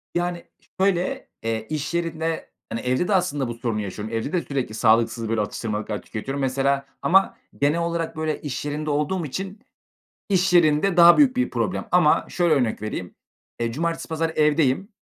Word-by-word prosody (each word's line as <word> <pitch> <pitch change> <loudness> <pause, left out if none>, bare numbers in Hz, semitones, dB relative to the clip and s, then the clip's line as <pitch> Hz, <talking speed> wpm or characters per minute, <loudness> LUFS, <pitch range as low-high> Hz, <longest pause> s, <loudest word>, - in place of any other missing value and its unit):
Yani, 175 0 -1 0.4
şöyle, 195 +7 0 0.2
eee, 110 -1 -2
iş 155 +1 -3
yerinde, 165 -1 -2 0.2
hani, 115 - -3
evde 130 +8 0
de 210 - +1
aslında 145 -7 0
bu 120 - -4
sorunu 115 -2 -2
yaşıyorum. 105 +3 -6
Evde 115 +6 -2
de 175 - +2
sürekli 130 -6 -3
sağlıksız 115 0 +2
böyle 115 -2 +1
atıştırmalıklar 105 0 -3
tüketiyorum 135 +6 -5
mesela 135 +1 +1 0.2
ama 195 +5 +3 0.2
genel 150 +4 +3
olarak, 170 -1 -2
böyle, 155 -1 -2
iş 145 -1 -4
yerinde 150 +1 -3
olduğum 150 +4 0
için, 195 +8 -5 0.7
iş 190 -1 +2
yerinde 170 +2 +4
daha 175 - +8
büyük 260 -4 +5
bir 255 - +1
problem. 185 - -2
Ama 175 -4 +4
şöyle 175 -3 +2
örnek 120 -6 0
vereyim, 95 -4 -5 0.5
eee, 115 0 -1
cumartesi, 165 +7 -2
pazar 160 0 -1
evdeyim 150 +3 +2
150 Hz, 170 wpm, -23 LUFS, 120-175 Hz, 0.7 s, daha